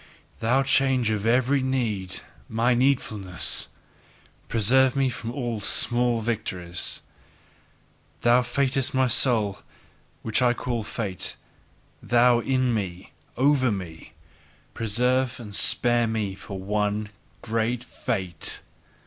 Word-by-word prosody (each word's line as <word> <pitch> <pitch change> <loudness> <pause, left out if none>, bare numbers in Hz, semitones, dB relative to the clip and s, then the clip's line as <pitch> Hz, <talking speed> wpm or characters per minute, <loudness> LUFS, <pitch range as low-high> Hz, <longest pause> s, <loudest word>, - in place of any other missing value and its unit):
Thou 125 +4 +2
change 135 -4 +2
of 105 0 -1
every 130 +4 +3
need, 110 -8 -1 0.3
MY 115 +3 +2
needfulness! 115 -8 -1 0.8
Preserve 125 +4 +3
me 135 -1 +2
from 115 -1 -5
all 120 -4 -3
small 120 +2 +1
victories! 90 -6 -2 1.2
Thou 120 +1 +5
fatedness 135 +2 0
of - - -8
my 130 0 +3
soul, 110 -4 +1 0.6
which 110 +3 +1
I 125 -1 +4
call 120 -2 -2
fate! 105 -4 -4 0.7
Thou 120 0 +4
In 130 0 +1
me! 95 -4 -4 0.3
Over 130 -1 +3
me! 90 -5 -7 0.6
Preserve 125 +3 +1
and 105 -4 -9
spare 120 +3 +3
me 110 -3 -2
for 100 +1 -8
one 105 +2 -1 0.3
great 115 +1 -1
fate! 95 -8 -2
120 Hz, 110 wpm, -25 LUFS, 105-125 Hz, 1.2 s, Thou